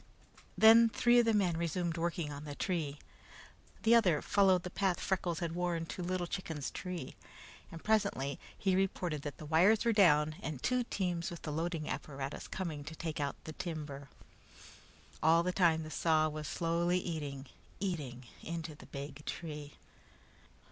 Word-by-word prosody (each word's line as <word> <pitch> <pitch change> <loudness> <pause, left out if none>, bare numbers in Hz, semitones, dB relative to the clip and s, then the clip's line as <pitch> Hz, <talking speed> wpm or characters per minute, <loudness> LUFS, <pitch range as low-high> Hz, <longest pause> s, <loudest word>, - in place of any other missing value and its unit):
Then 225 +1 +8
three 240 +2 +4
of 240 - +4
the 225 - +3
men 185 -5 +2
resumed 170 0 -1
work 170 0 -1
on 150 -3 -4
the 145 -1 -6
tree. 155 -6 -2 0.9
The 225 - +5
other 185 -10 +5
followed 190 -3 +4
the 180 - -6
path 190 -2 0
Freckles 180 -3 -1
had 170 -1 -2
worn 175 -1 -1
to 180 - -6
Little 180 0 -1
Chicken's 165 -6 -4
tree, 180 -7 -5 0.6
and 165 - -9
presently 140 -11 +1 0.2
he 190 -2 +1
reported 180 -5 0
that 145 -1 -6
the 155 - -9
wires 185 +9 +4
were 230 - +4
down 155 -6 +4
and 145 -3 -5
two 250 -1 +1
teams 180 -6 -2
with 170 -2 -9
the 155 - -3
loading 160 0 -2
apparatus 140 -1 -5
coming 160 -6 -4
to 160 +2 -7
take 160 -1 -4
out 140 -1 -1
the 155 - -7
timber. 150 -6 -6 1.1
All 165 +2 +5
the 180 - 0
time 170 -3 +3
the 155 - -8
saw 155 -1 +3
was 155 -1 -5
slowly 170 +1 +1
eating, 145 -6 -4 0.3
eating 145 -10 -3 0.2
into 165 -1 -5
the 150 - -14
big 140 +1 -7
tree. 150 -3 -6
165 Hz, 165 wpm, -33 LUFS, 150-185 Hz, 1.1 s, Then